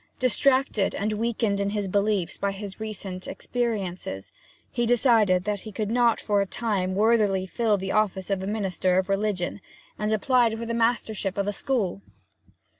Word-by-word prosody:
Distracted 260 Hz, -4 st, +2 dB
and 210 Hz, +2 st, -1 dB
weakened 220 Hz, -2 st, 0 dB
in 200 Hz, 0 st, 0 dB
his 205 Hz, -1 st, -2 dB
beliefs 200 Hz, -2 st, 0 dB
by 200 Hz, 0 st, 0 dB
his 195 Hz, 0 st, -7 dB
recent 195 Hz, -4 st, -6 dB
experiences, 195 Hz, -, -3 dB, 0.4 s
he 240 Hz, -1 st, 0 dB
decided 225 Hz, -7 st, +4 dB
that 210 Hz, 0 st, -2 dB
he 215 Hz, -, -9 dB
could 210 Hz, +1 st, -3 dB
not 235 Hz, -1 st, +3 dB
for 205 Hz, -2 st, +1 dB
a 200 Hz, -, -1 dB
time 190 Hz, -5 st, -1 dB
worthily 205 Hz, -3 st, +3 dB
fill 215 Hz, +2 st, +1 dB
the 190 Hz, 0 st, -4 dB
office 200 Hz, -2 st, 0 dB
of 195 Hz, -1 st, 0 dB
a 190 Hz, -, -4 dB
minister 190 Hz, -3 st, 0 dB
of 190 Hz, +1 st, 0 dB
religion, 195 Hz, -1 st, -1 dB, 0.4 s
and 210 Hz, 0 st, 0 dB
applied 230 Hz, +1 st, +2 dB
for 230 Hz, -, -5 dB
the 230 Hz, -, -3 dB
mastership 225 Hz, -4 st, 0 dB
of 200 Hz, -, 0 dB
a 205 Hz, -, 0 dB
school. 200 Hz, -5 st, -1 dB
210 Hz, 170 wpm, -26 LUFS, 195-230 Hz, 0.4 s, decided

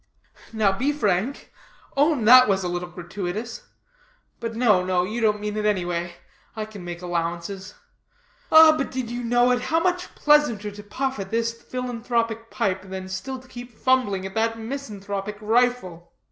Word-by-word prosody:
"Now 220 Hz, -3 st, +2 dB
be 265 Hz, +8 st, +1 dB
frank. 215 Hz, -2 st, -1 dB, 0.4 s
Own 285 Hz, -4 st, +2 dB
that 255 Hz, +2 st, +9 dB
was 195 Hz, -2 st, +1 dB
a -, -, -1 dB
little 175 Hz, 0 st, -3 dB
gratuitous. 180 Hz, +5 st, -6 dB, 0.7 s
But, 230 Hz, -1 st, -4 dB
no, 215 Hz, -6 st, +3 dB
no, 180 Hz, -1 st, +1 dB
you 220 Hz, +6 st, -3 dB
didn't 210 Hz, -1 st, +2 dB
mean 210 Hz, 0 st, -3 dB
it; 210 Hz, -, -1 dB
any 190 Hz, -4 st, +1 dB
way, 175 Hz, 0 st, -3 dB, 0.4 s
I 215 Hz, -1 st, -3 dB
can 210 Hz, -4 st, -10 dB
make 175 Hz, 0 st, -7 dB
allowances. 175 Hz, +3 st, -4 dB, 0.8 s
Ah, 315 Hz, 0 st, +9 dB
did 260 Hz, -5 st, -3 dB
you 240 Hz, -, -3 dB
but 235 Hz, -, -4 dB
know 245 Hz, +1 st, +4 dB
it, 245 Hz, 0 st, +1 dB
how 325 Hz, +6 st, +1 dB
much 360 Hz, +1 st, -1 dB
pleasanter 270 Hz, -9 st, +3 dB
to 205 Hz, +1 st, -10 dB
puff 260 Hz, +4 st, -3 dB
at 195 Hz, -1 st, -5 dB
this 230 Hz, +1 st, 0 dB
philanthropic 230 Hz, -2 st, -3 dB
pipe, 190 Hz, -1 st, -1 dB
than 190 Hz, 0 st, -7 dB
still 260 Hz, +8 st, -5 dB
to 255 Hz, 0 st, -15 dB
keep 240 Hz, -2 st, -11 dB
fumbling 250 Hz, -8 st, +1 dB
at 190 Hz, -, -6 dB
that 225 Hz, +1 st, 0 dB
misanthropic 210 Hz, -5 st, -5 dB
rifle. 215 Hz, -6 st, 0 dB
220 Hz, 170 wpm, -24 LUFS, 190-250 Hz, 0.8 s, that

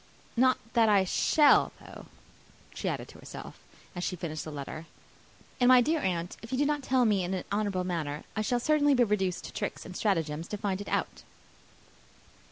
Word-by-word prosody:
"Not 255 Hz, +1 st, +4 dB, 0.2 s
that 230 Hz, -2 st, +4 dB
I 200 Hz, -2 st, +5 dB
shall, 290 Hz, -, +4 dB
though," -, -, -12 dB, 0.7 s
she -, -, -3 dB
added -, -, -4 dB
to -, -, -14 dB
herself, -, -, -10 dB, 0.3 s
and 175 Hz, -2 st, -5 dB
she 180 Hz, -, -2 dB
finished 160 Hz, -3 st, -5 dB
the 155 Hz, -, -7 dB
letter; 150 Hz, +3 st, -7 dB, 0.7 s
"and, 245 Hz, -, +4 dB
my 255 Hz, 0 st, +8 dB
dear 310 Hz, +6 st, +2 dB
aunt, 175 Hz, -3 st, -2 dB
if 230 Hz, -, -10 dB
you 260 Hz, -, 0 dB
do 290 Hz, -, +2 dB
not 295 Hz, 0 st, 0 dB
tell 255 Hz, -1 st, +2 dB
me 205 Hz, -4 st, +2 dB
in 180 Hz, +2 st, -2 dB
an 185 Hz, -, -3 dB
honourable 200 Hz, -3 st, 0 dB
manner, 155 Hz, -5 st, -3 dB
I 215 Hz, -, 0 dB
shall 240 Hz, +3 st, 0 dB
certainly 290 Hz, +1 st, +3 dB
be 250 Hz, -, +5 dB
reduced 190 Hz, -5 st, 0 dB
to -, -, -9 dB
tricks -, -, -4 dB
and 180 Hz, -, -9 dB
stratagems 165 Hz, -6 st, -1 dB
to 210 Hz, -, -4 dB
find 200 Hz, -1 st, -2 dB
it 205 Hz, -, -7 dB
out." -, -, -2 dB
205 Hz, 195 wpm, -29 LUFS, 175-245 Hz, 0.7 s, my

